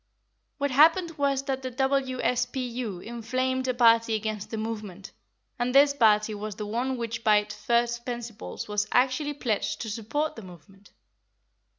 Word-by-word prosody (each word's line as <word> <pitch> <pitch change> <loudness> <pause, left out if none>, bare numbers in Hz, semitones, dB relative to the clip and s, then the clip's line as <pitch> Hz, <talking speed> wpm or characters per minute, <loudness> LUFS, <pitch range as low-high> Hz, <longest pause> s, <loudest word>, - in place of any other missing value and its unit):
What 285 -1 -1
happened 325 +5 +4
was 275 -1 +1
that 270 -1 -2
the 260 - -4
W.S.P.U. 255 -4 -1
inflamed 255 +3 -2
a 255 - +1
party 230 -2 +4
against 215 -1 -4
the 225 - -4
movement, 210 -4 -6 0.5
and 245 +2 -1
this 280 +1 +6
party 215 -4 +3
was 210 0 -5
the 210 - -5
one 245 +5 -2
which 235 0 -4
by 215 -1 +5
its 210 0 -2
first 235 +2 0
principles 235 -3 -6
was 210 0 -1
actually 270 +4 +1
pledged 210 -5 -2
to 220 - -4
support 240 +8 -2
the 225 - -8
movement. 190 +2 -15
235 Hz, 155 wpm, -27 LUFS, 215-260 Hz, 0.5 s, this